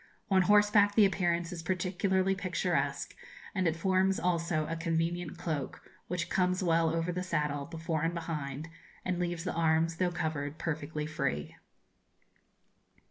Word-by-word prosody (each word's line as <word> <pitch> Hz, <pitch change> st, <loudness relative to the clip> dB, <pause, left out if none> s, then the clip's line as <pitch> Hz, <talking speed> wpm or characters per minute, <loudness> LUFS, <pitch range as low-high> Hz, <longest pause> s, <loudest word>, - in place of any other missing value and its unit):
On 190 Hz, -1 st, +6 dB
horseback 205 Hz, +1 st, +5 dB
the 215 Hz, -, +7 dB
appearance 175 Hz, -3 st, 0 dB
is 175 Hz, -2 st, -5 dB
particularly 185 Hz, +2 st, +1 dB
picturesque, 170 Hz, -7 st, -1 dB, 0.4 s
and 185 Hz, -3 st, +1 dB
it 160 Hz, -, +1 dB
forms 190 Hz, +2 st, +2 dB
also 170 Hz, -3 st, 0 dB
a 165 Hz, -, -3 dB
convenient 165 Hz, +1 st, -1 dB
cloak, 150 Hz, -6 st, -4 dB, 0.2 s
which 180 Hz, -1 st, -2 dB
comes 185 Hz, 0 st, +1 dB
well 165 Hz, -1 st, +3 dB
over 165 Hz, +2 st, 0 dB
the 180 Hz, +1 st, -2 dB
saddle, 150 Hz, -5 st, -1 dB
before 160 Hz, -1 st, -3 dB
and 165 Hz, +2 st, 0 dB
behind, 155 Hz, -3 st, -4 dB, 0.4 s
and 185 Hz, -1 st, -1 dB
leaves 175 Hz, -2 st, -2 dB
the 180 Hz, -, -2 dB
arms, 165 Hz, 0 st, +2 dB
though 180 Hz, 0 st, +2 dB
covered, 155 Hz, -3 st, -3 dB
perfectly 155 Hz, -1 st, -3 dB
free. 80 Hz, -, -2 dB
170 Hz, 140 wpm, -31 LUFS, 160-185 Hz, 0.4 s, the